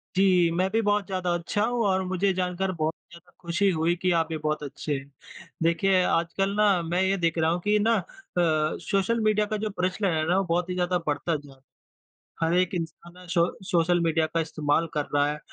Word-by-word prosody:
जी, 185 -3 +4
मैं 185 +3 +1
भी 225 +1 +2
बहुत 205 -1 +1
ज़्यादा 185 -2 -1
अच्छा 175 +5 -1
हूँ 240 0 0
और 190 0 +2
मुझे 190 +1 +1
जानकर 185 +1 -1
बहुत 160 -2 -1
ही - - -114
ज़्यादा 170 0 -16
ख़ुशी 185 +3 +1
हुई 165 +1 +1
कि 180 0 0
आप 165 -1 +2
भी 160 - -2
बहुत 155 0 -2
अच्छे 145 +1 -4
है। 135 - -8 0.6
देखिए, 185 +3 +3
आजकल 185 +5 0
ना 205 -4 +3
मैं 175 +3 0
ये 190 +1 +2
देख 170 -2 0
रहा 160 0 +2
हूँ 175 - 0
कि 210 +2 +2
ना 225 +2 +3
अ, 180 - -4 0.3
सोशल 175 +7 +1
मीडिया 215 -1 +2
का 215 +1 -3
जो 215 +1 -2
प्रचलन 185 +1 0
है 155 - 0
ना 180 - +3
वो 195 - +2
बहुत 175 +1 -1
ही - - -1
ज़्यादा 180 0 +1
बढ़ता 155 +3 0
जा 135 -2 -16 0.8
हर 165 +1 +2
एक 185 0 +1
इंसान 170 0 -6
ना 180 0 -14
सो 170 0 +3 0.3
सोशल 175 0 +3
मीडिया 165 -1 +2
का 165 - -2
इस्तेमाल 155 0 0
कर 150 -2 -1
रहा 145 0 +3
है। 150 - -6
175 Hz, 220 wpm, -26 LUFS, 165-195 Hz, 0.8 s, जी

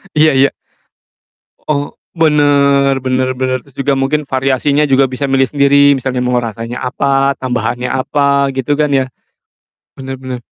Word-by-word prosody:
Iya 155 0 +4
iya. 135 +1 +3 1.2
Oh, 145 -1 -1 0.2
bener 140 -3 +3
bener 130 0 0
bener, 130 0 -1
terus 140 -1 -23
juga 140 0 0
mungkin 135 +3 -1
variasinya 135 +2 0
juga 135 0 +4
bisa 135 +2 -4
milih 135 0 +3
sendiri, 140 0 +4
misalnya 130 -1 -2
mau 125 0 0
rasanya 115 +1 -6
apa, 135 +1 0
tambahannya 125 0 -3
apa, 140 +1 +1
gitu 130 +2 -1
kan 150 - +2
ya? 135 -2 +1 0.9
Bener 135 0 -7
bener. 130 -1 -6
135 Hz, 145 wpm, -14 LUFS, 130-140 Hz, 1.2 s, Iya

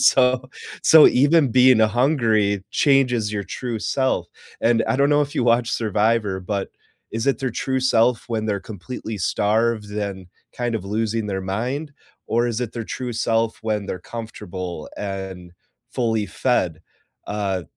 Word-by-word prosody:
So 130 0 +3 0.3
so 160 -1 +8
even 145 +1 +4
being 125 -1 +6
a 110 - +6
hungry 110 -6 +2
changes 125 -7 +2
your 100 -2 -3
true 120 -3 -4
self, 130 +4 0 0.3
and 115 0 +3
I - - +1
don't 140 +1 +3
know 145 0 +4
if 145 - -5
you 120 - +1
watch 120 0 +2
Survivor, 105 -2 0
but 100 +2 -3 0.4
is 115 +2 -3
it 140 - +2
their 130 -2 -2
true 130 +3 -2
self 120 -2 +2
when 110 -2 -2
they're 100 -2 -1
completely 110 +2 -7
starved 110 +3 +1
and 100 -3 -4 0.3
kind 120 -2 -2
of 105 - -3
losing 110 +2 -1
their 95 -2 -2
mind? 125 +10 -3 0.3
Or 120 +1 +1
is 120 0 -2
it 120 -2 -3
their 115 -2 -5
true 125 +2 -5
self 115 0 0
when 105 -2 -2
they're - - -4
comfortable 95 -7 -7
and 95 -3 -6 0.4
fully 110 -4 0
fed? 90 -13 0 0.5
Uh, 100 -3 -2
115 Hz, 160 wpm, -22 LUFS, 105-125 Hz, 0.5 s, so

